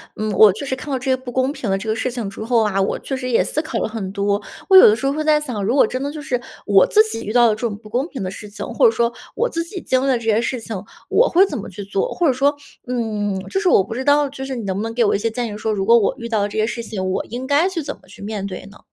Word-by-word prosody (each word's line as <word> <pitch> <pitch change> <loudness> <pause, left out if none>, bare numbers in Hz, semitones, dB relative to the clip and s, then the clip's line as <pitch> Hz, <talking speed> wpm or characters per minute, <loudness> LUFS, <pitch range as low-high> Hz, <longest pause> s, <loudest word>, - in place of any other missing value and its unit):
嗯， 215 0 -2
我 210 0 +7
就 220 - -6
是 265 - -2
看 265 +3 -9
到 270 - 0
这 250 - -8
些 - - +4
不 260 -1 -8
公 260 +2 +1
平 255 -7 -5
的 195 - +1
这 205 - -7
个 220 - +1
事 225 +3 -1
情 235 -5 -4
之 200 +2 -7
后 230 0 +2
啊， 195 -2 0
我 195 - 0
确 270 - -4
实 255 -1 -4
也 235 - +3
思 305 - 0
考 310 -7 -4
了 - - -1
很 215 -4 -5
多， 200 +1 0 0.3
我 380 - +9
有 - - +10
的 215 - +5
时 255 - -5
候 275 - +2
会 310 +1 -2
在 305 -1 +4
想， 245 -9 -3
如 225 +6 +1
果 285 - +6
真 255 +4 -4
的 285 +1 -3
就 305 0 -7
是， 255 -4 -2 0.3
我 195 -2 +5
自 430 - +5
己 435 - -2
遇 210 - -4
到 240 -1 +6
了 - - +4
这 - - -13
种 205 -3 -6
不 215 0 -15
公 250 +7 -1
平 265 - -6
的 185 - -3
事 210 +1 -9
情， 205 - -6
或 - - +1
者 460 - +7
说 235 - +1 0.2
我 485 - 0
自 335 -6 -2
己 355 +2 -7
经 260 0 +1
历 - - 0
的 260 -2 +3
这 230 - -9
些 225 0 +2
事 245 +2 -2
情， 225 -1 -6 0.3
我 - - +4
会 370 +3 +5
怎 - - -5
么 - - -7
去 200 +2 -8
做？ 195 0 -2
或 350 - 0
者 270 - +3
说， 280 +3 +2 0.3
嗯， 215 -5 -2
就 385 - 0
是 390 - -1
我 195 - +5
不 200 - -7
知 255 +3 -3
道 290 0 +4
就 270 -1 -7
是 270 -1 -4
你 235 - -5
能 190 -2 -2
不 200 - -2
能 225 0 -4
给 235 0 +2
我 210 - +2
一 - - 0
些 230 - 0
建 230 -1 -3
议 - - -6
说， 220 +1 -2
如 195 -2 -1
果 230 +3 +6
我 210 - 0
遇 235 -1 -7
到 220 -2 +1
了 205 - +1
这 - - -6
些 215 - +2
事 235 +1 -4
情， 215 -4 -4
我 - - -2
应 245 +3 -6
该 290 +6 +3
去 345 -4 -4
怎 280 - -4
么 - - -24
去 190 - -14
面 205 -1 -4
对 190 -1 -7
呢？ 200 - -15
235 Hz, 375 characters per minute, -20 LUFS, 210-275 Hz, 0.3 s, 有